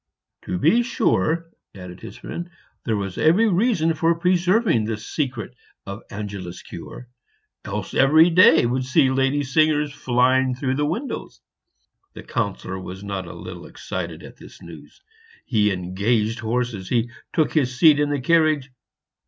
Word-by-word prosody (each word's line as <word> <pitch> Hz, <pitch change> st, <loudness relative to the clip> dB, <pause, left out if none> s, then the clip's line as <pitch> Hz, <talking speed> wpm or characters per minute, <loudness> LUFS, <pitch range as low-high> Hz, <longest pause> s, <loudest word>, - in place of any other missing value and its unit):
"To 90 Hz, -, -2 dB
be 230 Hz, -, +3 dB
sure," 165 Hz, -8 st, 0 dB, 0.2 s
added 90 Hz, -2 st, -10 dB
his -, -, -10 dB
friend, 175 Hz, +1 st, -7 dB, 0.4 s
"there 110 Hz, -3 st, 0 dB
was 100 Hz, -2 st, -4 dB
every 185 Hz, +9 st, +4 dB
reason 190 Hz, -4 st, +2 dB
for 165 Hz, +2 st, +1 dB
preserving 180 Hz, -, +2 dB
the 110 Hz, 0 st, -3 dB
secret 125 Hz, -1 st, -4 dB, 0.3 s
of 100 Hz, +2 st, -7 dB
Angela's 100 Hz, -4 st, -7 dB
cure, 125 Hz, -, -10 dB, 0.6 s
else -, -, -5 dB
every 160 Hz, +5 st, +5 dB
day 165 Hz, -5 st, +6 dB
would 130 Hz, +2 st, 0 dB
see 130 Hz, +1 st, +3 dB
lady 135 Hz, +2 st, +1 dB
singers 150 Hz, +1 st, +1 dB
flying 130 Hz, 0 st, +2 dB
through 130 Hz, +2 st, -1 dB
windows." 185 Hz, -, -4 dB, 0.7 s
The -, -, -10 dB
Councillor 100 Hz, -6 st, -3 dB
was 95 Hz, +1 st, -8 dB
not 100 Hz, -3 st, -5 dB
a -, -, -8 dB
little -, -, -9 dB
excited -, -, -6 dB
at -, -, -12 dB
this -, -, -14 dB
news; 85 Hz, -, -14 dB, 0.4 s
he 105 Hz, -3 st, +2 dB
engaged 105 Hz, +5 st, -1 dB
horses; 115 Hz, -4 st, -3 dB
he 120 Hz, -1 st, 0 dB, 0.2 s
took 155 Hz, -, +1 dB
his 130 Hz, -5 st, 0 dB
seat 150 Hz, 0 st, +6 dB
in 145 Hz, 0 st, +1 dB
the 145 Hz, -1 st, -1 dB
carriage. 155 Hz, -2 st, +2 dB
130 Hz, 145 wpm, -22 LUFS, 105-160 Hz, 0.7 s, day